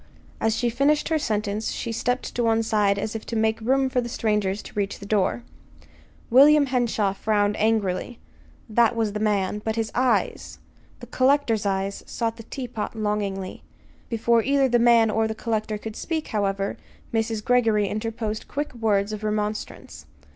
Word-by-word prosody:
As 225 0 +1
she 240 0 0
finished 285 +6 +2
her 320 -1 +2
sentence 210 -4 -1
she 230 - -4
stepped 245 +3 -2
one 225 -1 +2
side 210 -2 +2
as 215 +2 -3
if 220 - -4
to 230 - -4
make 220 0 +1
room 265 +4 +2
for 255 -1 0
the 240 - -5
strangers 210 -3 -1
to - - -11
reach 200 -1 -2
the 200 - -10
door. 210 +3 0 0.9
William 285 +4 +7
Henshaw 240 -6 0
frowned 205 0 +1
angrily 215 +1 0 0.5
that 235 +1 +3
was 220 -3 0
the 210 - -3
man; 210 -1 0
but 220 -1 -1
his 225 -1 -2
eyes 255 0 0 0.4
the - - -7
collector's 255 -6 +2
eyes 195 0 -2
sought 230 -1 -2
the - - -8
teapot 245 -5 -5
longingly. 205 -3 -3 0.5
Before 230 0 +2
either 275 +3 +2
the 240 -1 +2
man 230 -2 +5
or 220 +1 +1
the 220 - -4
collector 220 -2 -2
could 215 +1 -7
speak, 320 -2 -3
however; 195 -2 -1 0.4
Mrs. 225 -1 -1
Greggory 225 -5 +3
interposed 220 0 -4
quick 290 +1 -4
words 215 -3 0
of 215 0 -6
remonstrance. 210 0 -4
220 Hz, 165 wpm, -24 LUFS, 210-240 Hz, 0.9 s, William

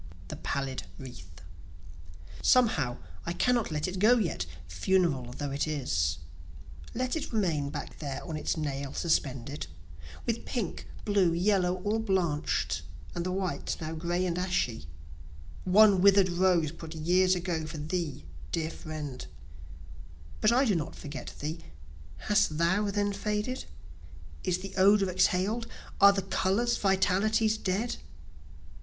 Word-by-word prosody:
The - - -5
Pallid 135 -2 -3
Wreath 90 - -11 1.0
Somehow 170 - +3 0.3
I 170 - 0
cannot 240 +4 +2
let 150 0 -1
it 185 0 -4
go 230 +5 +6
yet, 170 - -1 0.2
funeral 135 - +1
though 145 -1 -3
it 140 +3 -1
is, 75 - 0 0.8
Let 255 +3 -1
it 320 - -4
remain 165 -10 0
back - - -7
there 140 -3 -4
on 160 - -4
its 155 - -1
nail 140 -3 -3
suspended, 140 -4 -1 0.6
With 230 0 -1
pink, 225 -9 -4 0.2
blue, 195 -5 +3
yellow, 180 0 +2
all 215 +2 +1
blanch'd, 185 -8 0 0.3
and 175 - -2
the 185 - -2
white 185 -1 -2
now 160 0 -4
gray 175 +3 -1
and 175 -1 -1
ashy, 150 - -1 0.8
One 200 0 +6
wither'd 195 -1 +6
rose 175 -3 +2
put 165 0 -9
years 180 +4 +3
ago 170 -3 -2
for 155 - -6
thee, 155 - -3 0.3
dear 160 -1 -1
friend; 150 -6 -6 1.2
But 215 - +5
I 255 +3 +4
do 215 - +3
not 160 -5 -2
forget 145 -1 -7
thee. 155 +3 -3 0.7
Hast 205 -7 +2
thou 190 +5 +2
then 205 0 0
faded? 210 +5 -2 0.8
Is 180 - +1
the 190 +1 -8
odor 195 0 +5
exhaled? 200 +6 +1 0.3
Are 200 0 +9
the 195 -1 -1
colors, 195 +5 +1
vitalities, 205 +3 +2
dead? 215 +3 -1
180 Hz, 135 wpm, -29 LUFS, 155-205 Hz, 1.2 s, Are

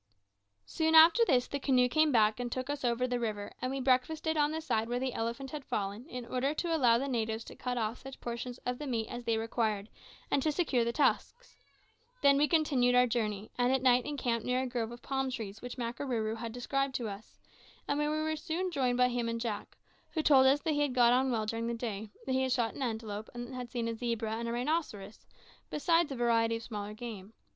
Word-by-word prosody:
Soon 320 0 +1
after 330 +8 +8
this 255 - +3
the 280 - -3
canoe 255 -2 +3
came 310 +4 +3
back 220 -2 +3
and 245 -1 -3
took 255 +3 -3
us 290 -1 -5
over 240 0 +1
the 245 -1 -1
river; 210 -3 -3
and 255 - -1
we 270 - -2
breakfasted 275 +5 +1
on 295 -1 +2
the 320 - -2
side 225 -8 -1
where 245 - 0
the 255 0 -2
elephant 235 +4 -3
had 300 -2 -6
fallen, 205 +3 -3
in 250 -1 -6
order 260 +5 -1
to 335 0 0
allow 240 -6 +4
the 270 +3 -2
natives 225 -3 -1
to - - -11
cut 250 -1 -3
off 225 0 -2
such 270 0 -10
portions 240 +1 -5
of 250 0 -2
the 295 - -5
meat 230 -4 -1
as 240 0 -6
they 225 -1 +1
required, 220 -2 -1 0.4
and 275 - +3
to 310 - +1
secure 290 -7 +1
the 235 - 0
tusks. 315 - 0 0.7
Then 280 0 +7
we 295 - +4
continued 275 -7 +3
our 250 0 +6
journey, 215 -3 -2
and 245 +1 +3
at 265 -1 +1
night 250 -1 +5
encamped 245 -6 -1
near 250 +1 0
a - - -2
grove 240 -3 -3
of 240 - -11
palm 270 -1 -1
trees 220 -4 -6
which 245 +1 -7
Makarooroo 235 -2 -2
had 230 0 -5
described 270 +3 -2
to 235 - -2
us, 200 +1 -9 0.5
and 285 - 0
where 295 0 +1
we 310 +1 -1
were 315 0 -1
soon 355 +3 -3
joined 255 -5 +1
by 250 0 +4
him 240 -1 -1
and 230 0 -2
Jack, 225 -3 -4 0.4
who 315 - 0
told 265 -3 +6
us 280 +2 +4
that 315 - 0
he 290 - 0
had 285 -4 0
got 240 -1 +6
on 260 +1 +3
well, 225 -3 0
during 230 +2 -2
the 235 - -1
day 220 -3 -4 0.2
that 265 - -3
he 260 - +2
had 260 0 0
shot 240 -3 +1
an - - -8
antelope, 220 -3 -4
and 240 +2 -6
had 250 -1 -6
seen 235 -1 -2
a 230 - -1
zebra 230 -1 -2
and 235 0 -4
a - - -2
rhinoceros, 240 -6 -3 0.4
besides 330 0 +2
a - - -3
variety 230 -1 +2
of 230 - -6
smaller 210 -2 -6
game. 220 -3 -8
245 Hz, 235 wpm, -31 LUFS, 230-275 Hz, 0.7 s, after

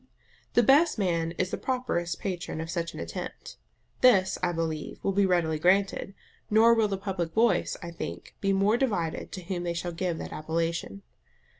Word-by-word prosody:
The 240 - +6
best 295 +6 +5
man 170 -4 0
is 185 +1 -2
the - - -3
properest 210 -10 -2
patron 180 -4 -4
of 160 +1 -4
such 170 0 -3
an - - -7
attempt. - - -7 0.4
This, 195 -7 +5
I 180 -1 +1
believe, 160 -2 -3
will 195 - +1
be 195 0 +3
readily 165 -4 +1
granted; 195 +3 +2 0.3
nor 225 +2 +6
will 225 -2 +3
the 195 -1 -2
public 185 -4 -3
voice, 230 +1 +2
I 170 - -6
think, 85 - -7
be 195 - +2
more 200 +4 +3
divided 200 -11 -1
to 185 - -6
whom 180 0 -3
they 170 -1 -2
shall 175 +1 -3
give 170 0 -2
that - - -6
appellation. 160 -10 -3
180 Hz, 180 wpm, -28 LUFS, 165-200 Hz, 0.4 s, The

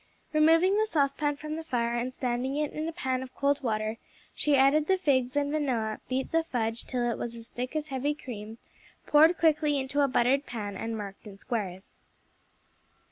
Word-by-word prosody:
Removing 330 +6 +5
the 435 - +2
saucepan 290 -3 +1
from 305 +2 -5
the 325 - -5
fire 235 -6 -1
and 240 +2 -2
standing 255 +1 -2
it 300 -1 -1
in 310 +1 -3
a - - -2
pan 260 -6 -2
of 260 0 -9
cold 285 0 +1
water, 215 -2 -1 0.4
she 295 -1 +2
added 275 +3 +4
the 380 - +3
figs 260 -7 +1
and 290 0 +1
vanilla, 245 -8 -1
beat 260 +1 -2
the 330 - +3
fudge 230 -7 -3
till 245 -1 -1
it - - -4
was 235 0 -4
as 230 0 -10
thick 250 +4 -5
as 310 0 -2
heavy 275 +2 -1
cream, 220 -5 -8 0.5
poured 315 +4 +6
quickly 305 -2 +3
into 275 +2 0
a 280 - +4
buttered 265 +2 +2
pan 205 -4 -5
and 225 +3 -4
marked 205 +1 -8
in 200 -1 -10
squares. 195 -5 -4
265 Hz, 190 wpm, -28 LUFS, 235-300 Hz, 0.5 s, poured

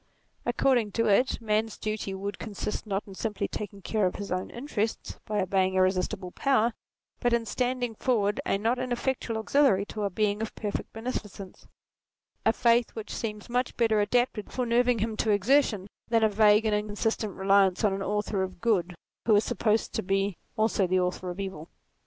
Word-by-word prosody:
According 240 -6 +2
to 230 - +1
it, 220 +5 +3
man's 220 -1 0
duty 215 -2 -3
would 200 +1 -5
consist, 210 0 -4
not 195 0 -1
in 195 - -11
simply 210 +1 -2
taking 200 -2 -7
care 210 -1 +1
of 180 - -4
his 200 -2 -6
own 185 +1 -2
interests 235 -4 -3
by 210 -1 0
obeying 190 0 +1
irresistible 185 0 +1
power, 240 -2 +2 0.5
but 245 -1 +1
in 235 -1 +1
standing 245 0 -1
forward 210 -3 0
a - - +1
not 230 +5 0
ineffectual 250 -2 -2
auxiliary 220 -4 +3
to 210 - -6
a 200 - 0
Being 210 +2 0
of 220 - -4
per 210 -2 -3
fect - - -5
beneficence; 215 -5 -6 0.8
a - - +7
faith 235 0 +2
which 220 -1 -6
seems 210 -2 -4
much 245 +1 -1
better 220 -3 +3
adapted 240 -1 0
for 250 - -1
nerving 240 +1 +3
him 220 +1 -1
to 220 - 0
exertion 210 0 +3 0.2
than 230 -1 +2
a 220 - +5
vague 210 +1 +5
and 215 - +2
inconsistent 210 0 -1
reliance 195 0 +3
on 205 -2 +3
an 195 - -3
Author 205 0 -1
of 185 -1 -4
Good 180 -5 +1 0.3
who 220 - +6
is 205 - +4
supposed 220 0 0
to - - -1
be 195 0 0 0.2
also 215 -3 +2
the 185 +1 +2
author 180 0 -2
of 180 +2 -6
evil. 190 -5 -5
210 Hz, 185 wpm, -28 LUFS, 195-230 Hz, 0.8 s, a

